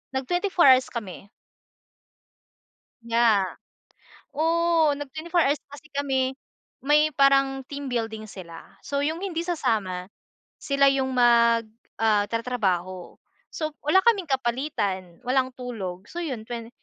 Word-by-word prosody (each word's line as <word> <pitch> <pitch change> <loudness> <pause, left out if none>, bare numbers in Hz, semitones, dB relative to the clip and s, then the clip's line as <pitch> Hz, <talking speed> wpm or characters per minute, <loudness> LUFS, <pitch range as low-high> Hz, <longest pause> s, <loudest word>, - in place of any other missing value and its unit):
nag-24 355 +7 0
hours 260 -1 +6
kami. 205 -4 -7 1.8
Yeah. 230 -4 +3 0.9
Oo, 325 -1 +2
nag-24 315 +5 -2
hours 285 +2 +1
pa 285 - -11
kasi 300 - -16
kami. 265 -2 0 0.5
May 300 +2 +3
parang 275 0 +3
team 285 -1 -6
building 225 -3 -3
sila, 170 -4 -10 0.2
so 280 0 -2
yung 310 +3 -1
hindi 335 -4 -2
sasama 215 - -1 0.6
sila 275 -1 +1
yung 265 -1 -1
mag, 235 -1 +4 0.4
ah, 210 -2 +3
tatrabaho. 190 -7 -2 0.4
So 310 -1 -3
wala 375 +6 +5
kaming 400 -8 +3
kapalitan, 235 - -2
walang 255 0 +1
tulog, 200 -7 -6
so 345 - -6
'yon, 245 -8 -5
20 230 -1 -6
260 Hz, 120 wpm, -25 LUFS, 225-295 Hz, 1.8 s, hours